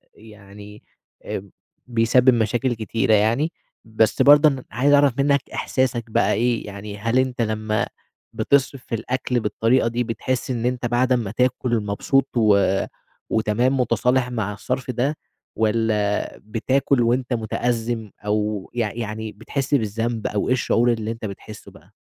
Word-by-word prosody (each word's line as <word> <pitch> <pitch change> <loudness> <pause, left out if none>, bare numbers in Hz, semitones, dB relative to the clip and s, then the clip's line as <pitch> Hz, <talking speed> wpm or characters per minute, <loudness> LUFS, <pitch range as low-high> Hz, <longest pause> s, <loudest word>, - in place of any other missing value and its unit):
يعني 105 -1 -14 0.4
آآ 95 0 -5 0.4
بيسبب 120 +2 +4
مشاكل 120 +2 0
كتيرة 110 0 0
يعني 115 +10 +2 0.3
بس 110 +3 +1
برضه 145 +3 +7
أنا 135 -2 -4
عايز 135 +6 +2
أعرف 145 -2 +5
منّك، 140 0 +3
إحساسك 125 -3 -1
بقى - - +2
إيه؟ 120 +2 0
يعني 100 +1 -8
هل 115 +4 +1
أنت 130 -2 -1
لمّا 110 -1 -1 0.5
بتصرف 135 -2 +1
في 115 - -3
الأكل 125 +2 -2
بالطريقة 115 +3 +1
دي، 120 +1 -1
بتحس 125 +3 -3
إن 120 -1 -2
أنت 125 0 -1
بعد 120 +2 +1
أمّا 115 -5 +1
تاكل، 125 0 0
مبسوط 130 +7 0
و 105 -3 +5 0.7
وتمام 120 +5 +1
مُتصالح 125 +1 +1
مع 105 -4 -2
الصرف 125 +5 -3
ده، 135 +5 -1 0.4
والّا 110 -2 0
بتاكل 125 +4 +1
وأنت 125 +2 +1
مُتأزم 115 -1 -2
أو 105 -1 -1
يع 115 -4 -1
يعني 110 -1 -5
بتحس 130 +7 -4
بالذنب، 115 -1 -1
أو 105 - -2
إيه - - +3
الشعور 120 -1 +2
اللي 110 0 -3
أنت 115 -1 -6
بتحسّه 105 +1 -9
بَقى؟ - - -19
115 Hz, 145 wpm, -22 LUFS, 110-125 Hz, 0.7 s, برضه